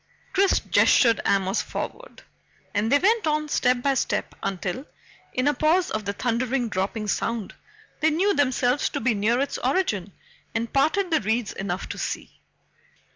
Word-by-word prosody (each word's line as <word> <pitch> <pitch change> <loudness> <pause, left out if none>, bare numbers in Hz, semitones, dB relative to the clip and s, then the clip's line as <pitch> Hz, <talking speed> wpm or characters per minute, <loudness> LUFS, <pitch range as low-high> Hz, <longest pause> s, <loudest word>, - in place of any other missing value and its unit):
Chris 390 0 +3
gestured 230 -3 +4
Amos 195 +1 +2
forward, - - -7 0.5
and 215 +3 0
they 285 - +6
went 420 +3 +2
on 305 0 0
step 250 -3 +1
by 275 - +3
step 265 - -1
until, 195 +5 -3 0.5
in 255 +2 0
a 290 - +4
pause 320 +6 +2
of 215 -1 -3
the 200 - -2
thundering 245 +2 -1
dropping 205 +2 -2
sound, 225 0 -2 0.5
they 315 - +3
knew 375 +6 +2
themselves 260 -3 +1
to - - -3
be 235 0 +1
near 215 +4 +1
its 280 - -2
origin 245 - 0 0.4
and 230 0 -2
parted 335 +7 +2
the 315 - +3
reeds 220 +1 -1
enough 195 -1 -4
to - - -5
see. - - -5
245 Hz, 160 wpm, -25 LUFS, 215-300 Hz, 0.5 s, they